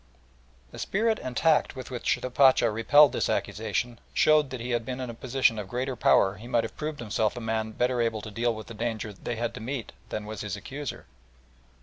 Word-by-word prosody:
The - - -10
spirit 220 +2 +1
and 125 -2 -5
tact 160 -3 +3
with 130 0 -8
which 120 -2 0
the 130 - -5
Pacha 130 -3 +5
repelled 140 +6 +6
this - - -1
accusation 120 -1 -2 0.2
showed 155 -2 +4
that 130 -1 -5
had 115 - -6 0.2
he - - -14
been 125 +2 -5
in 125 -2 -4
a - - -9
position 120 -1 +1
of 100 - -5
greater 130 +2 -2
power 95 -3 +3
he 115 +4 -10
might 120 -2 +2
have 115 - -6
proved 150 -1 -4
himself 110 -1 -1
a - - -2
man 110 -1 -2
better 125 +1 +1
able 115 -2 0
to 110 - -7
deal 115 +2 0
with 110 - -8
the 115 - -9
danger 110 -1 -3
they 120 +4 -5
had 115 +1 -2
to - - -7
meet 125 +1 -4 0.2
than 105 - -4
was 110 0 -6
his 105 0 -3
accuser. 135 +7 -6
120 Hz, 225 wpm, -27 LUFS, 110-130 Hz, 0.2 s, repelled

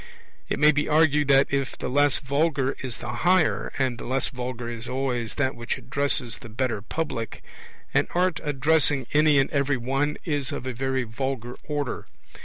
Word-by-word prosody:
It - - 0
may 150 +1 +6
be 150 0 0
argued 150 -2 +4
that, 135 -1 +6
if 140 -1 -1
the - - -4
less 145 +1 +3
vulgar 140 -1 0
is 130 -3 -5
the 115 -2 -5
higher, 185 +5 +2
and 130 -3 0
the - - -7
less 130 +2 0
vulgar 125 -2 -5
is 120 0 -6
always 125 -4 -2
that 130 -2 +1
which 120 0 -3
addresses 135 -3 -1
the 115 - -10
better 115 -1 -1
public, 120 -2 -4 0.5
an - - +3
art 180 -2 +2
addressing 145 -1 +2
any 150 -1 +5
and 135 - +3
every 140 -1 +1
one 135 +4 -1
is 145 -5 -1
of - - -5
a 130 - -2
very 130 +1 -1
vulgar 125 +1 -4
order. 145 -4 -3
135 Hz, 180 wpm, -25 LUFS, 125-145 Hz, 0.5 s, may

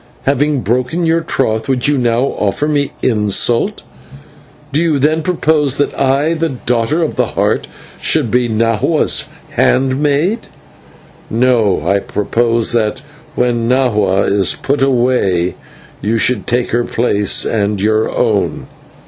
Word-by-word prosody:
Having 140 0 +1
broken 125 - -1
your 165 0 +2
troth, 110 -6 -1
would 130 -1 +1
you 145 - +2
now 120 -2 +1 0.2
offer 105 +8 0
me 145 -2 0
insult? 115 - +1 0.9
Do 150 - +2
you 165 -4 +1
then 155 +4 +1
propose 155 -5 +1
that 145 - 0
I, 140 +4 +1
the 165 0 -1
Daughter 125 +4 -1
of 155 - -3
the - - +1
Heart, - - -1 0.3
should 145 -8 +1
be 125 -1 +1
Nahua's 115 0 +1 0.2
handmaid?" 145 - +1 0.8
"No, 115 -4 +1
I 100 0 +2
propose 115 +3 0
that 115 +2 -1 0.3
when 120 -1 0
Nahua 105 -7 +2
is 100 -2 +1
put 140 0 -2
away 120 -9 +1 0.5
you 110 +2 0
should 115 -2 0
take 120 0 0
her 120 +1 +1
place 105 -5 0
and 105 -2 -1
your 110 +2 +1
own." 110 -5 -1
125 Hz, 130 wpm, -15 LUFS, 110-145 Hz, 0.9 s, your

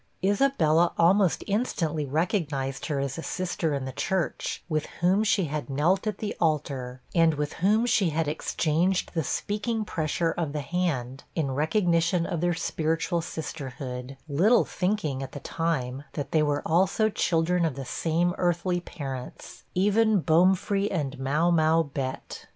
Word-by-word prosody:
Isabella 190 - +3
almost 180 +1 +3
instantly 165 - -1
recognized 150 -3 -1
her 145 -3 -1
as 135 +2 -3
a - - -3
sister 170 -4 -2
in 135 -1 -3
the 130 - -4
church, 180 +6 -2
with 155 -3 -1
whom 185 +5 +3
she 205 -4 +2
had 150 -1 -4
knelt 170 +9 +1
at 215 - -1
the 210 - -4
altar, 135 -6 -1
and 165 -2 +4
with 150 0 -2
whom 215 +5 +3
she 210 -6 +3
had 160 0 -1
exchanged 165 +4 0
the 165 -2 0
speaking 215 - -2
pressure 165 -1 -1
of 165 -4 -3
the 150 - -2
hand, 140 -6 -2
in 150 -5 0
recognition 170 +3 +2
of 170 -3 -3
their 175 -1 +1
spiritual 165 +1 -1
sisterhood; 135 -5 -6
little 185 +12 +4
thinking, 180 -8 -1
at 135 - -6
the 145 - -6
time, 140 -5 -2
that 145 - -4
they 155 - +3
were 145 -1 0
also 190 +6 +3
children 175 -3 +1
of 160 -5 0
the 135 -1 -6
same 170 +5 0
earthly 175 0 +1
parents 135 -7 -8
even 210 +3 +3
Bomefree 190 +5 +3
and 145 -6 -3
Mau 150 +6 +1
mau 160 0 +4
Bett. 135 -3 -5
165 Hz, 155 wpm, -27 LUFS, 145-185 Hz, -, and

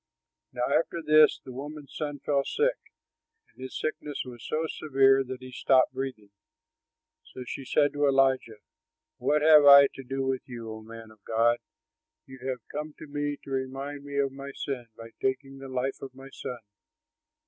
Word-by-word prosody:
Now 125 -1 -3
after 165 +1 0
this 155 0 +6
the 130 - -8
woman's 145 +3 -8
son 145 -2 -3
fell 140 -2 +1
sick; 475 - 0 0.7
and - - -17
his 130 0 -6
sickness 150 -1 -3
was 120 -2 -10
so 155 +1 -1
severe 135 -3 +3
that 130 0 -8
he 130 - -9
stopped 130 0 +3
breathing. 130 -6 -5 0.9
So 130 - -10
she 130 +2 -6
said 145 +2 +2
to 145 0 +2
Elijah, 130 -5 +2 0.6
"What 150 0 +2
have 155 -1 +8
I 140 -1 +10
to - - -8
do 135 +1 -3
with 130 -1 -1
you, 115 -2 -7
O 110 - -9
man 115 0 -11
of 110 -2 -21
God? 115 +1 +2 0.7
You 130 -1 -12
have 130 -1 -5
come 150 +1 -5
to - - -9
me 145 0 -3
to 140 - -10
remind 135 +2 -4
me 140 0 -6
of 140 -1 +1
my 140 +1 -8
sin 130 -4 -4
by 115 0 -10
taking 135 +1 -2
the 135 0 -9
life 130 +1 -2
of 135 -1 -9
my 135 +1 -12
son!" 125 - -6
135 Hz, 180 wpm, -28 LUFS, 130-145 Hz, 0.9 s, I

